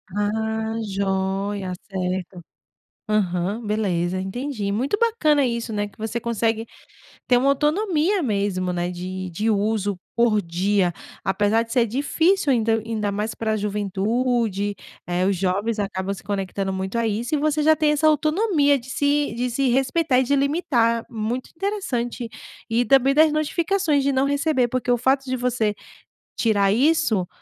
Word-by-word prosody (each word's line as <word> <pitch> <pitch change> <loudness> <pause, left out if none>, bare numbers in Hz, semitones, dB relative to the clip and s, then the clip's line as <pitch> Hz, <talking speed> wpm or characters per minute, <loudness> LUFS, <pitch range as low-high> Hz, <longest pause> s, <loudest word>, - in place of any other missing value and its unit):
Ah, 220 +1 -1
joia, 195 -1 -2 0.2
certo. 185 -1 -3 0.7
Aham, 200 +2 0
beleza, 185 -4 -1
entendi, 210 0 -3
muito 260 - 0
bacana 310 -12 +3
isso, 235 -2 -2
né, 205 0 -1
que 205 - -20
você 225 +1 -3
consegue 230 -1 -1 0.6
ter 245 - +5
uma 270 +3 +3
autonomia 330 +5 +1
mesmo, 200 -5 -1
né, 175 0 -1
de 185 +1 -5
de 215 +6 0
uso 205 -2 0 0.2
por 230 -3 +3
dia, 180 +2 +1 0.3
apesar 205 +3 +2
de 230 0 -7
ser 245 -3 +3
difícil, 290 - +1
ainda 225 -2 +2
ainda 215 -2 -2
mais 210 +2 -3
pra 220 -1 -1
juventude, 210 +1 -1 0.3
eh, 180 +1 0
os 200 - +2
jovens 200 +5 0
acabam 195 -1 -2
se 200 - -6
conectando 195 -1 -3
muito 190 +4 -3
a 230 - +1
isso 225 +6 -1
e - - +1
você 305 +1 +1
já 315 +1 +5
tem 310 -1 +2
essa 300 +1 +2
autonomia 305 - +3
de 240 - -14
se 285 -1 +1
de 245 +1 -1
se 270 +2 +1
respeitar 265 +3 +2
e 260 - +3
de 280 +3 +1
limitar, 270 -6 +1
muito 230 +3 -4
interessante. 280 - -2 0.4
E 230 +2 +2
também 270 +1 +4
das 310 +1 +5
notificações 310 0 +1
de 280 - +2
não 265 0 +2
receber, 285 -2 +1
porque 255 +1 -3
o 245 - +3
fato 265 +3 +1
de 255 -1 -2
você 235 -4 0 0.6
tirar 200 -4 +2
isso, 235 - +2
230 Hz, 155 wpm, -23 LUFS, 200-275 Hz, 0.7 s, ter